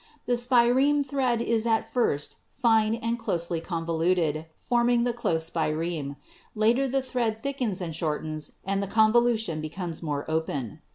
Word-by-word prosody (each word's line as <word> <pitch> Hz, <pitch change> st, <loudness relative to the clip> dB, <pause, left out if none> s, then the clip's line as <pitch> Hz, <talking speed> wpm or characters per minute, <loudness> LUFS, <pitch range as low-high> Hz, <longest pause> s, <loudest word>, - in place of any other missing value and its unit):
The 245 Hz, -, +1 dB
spireme 250 Hz, +4 st, +4 dB
thread 255 Hz, -4 st, 0 dB
is 230 Hz, -1 st, 0 dB
at 225 Hz, -1 st, 0 dB
first 150 Hz, -, 0 dB
fine 225 Hz, -3 st, +2 dB
and 230 Hz, +1 st, -2 dB
closely 170 Hz, -6 st, -1 dB
convoluted, 165 Hz, -2 st, 0 dB
form 240 Hz, 0 st, +1 dB
ing 240 Hz, -1 st, +3 dB
the 245 Hz, -1 st, 0 dB
'close 165 Hz, -9 st, 0 dB
spireme.' 155 Hz, -2 st, -2 dB, 0.4 s
Later 230 Hz, +5 st, +3 dB
the 265 Hz, +1 st, 0 dB
thread 235 Hz, -4 st, -2 dB
thickens 250 Hz, -9 st, -1 dB
and 165 Hz, -3 st, -4 dB
shortens 155 Hz, -1 st, -3 dB
and 195 Hz, +1 st, 0 dB
the 200 Hz, -, -2 dB
convolution 220 Hz, -5 st, +3 dB
becomes 165 Hz, +2 st, -5 dB
more 145 Hz, -3 st, -3 dB
open. 150 Hz, -8 st, -3 dB
215 Hz, 150 wpm, -27 LUFS, 160-240 Hz, 0.4 s, spireme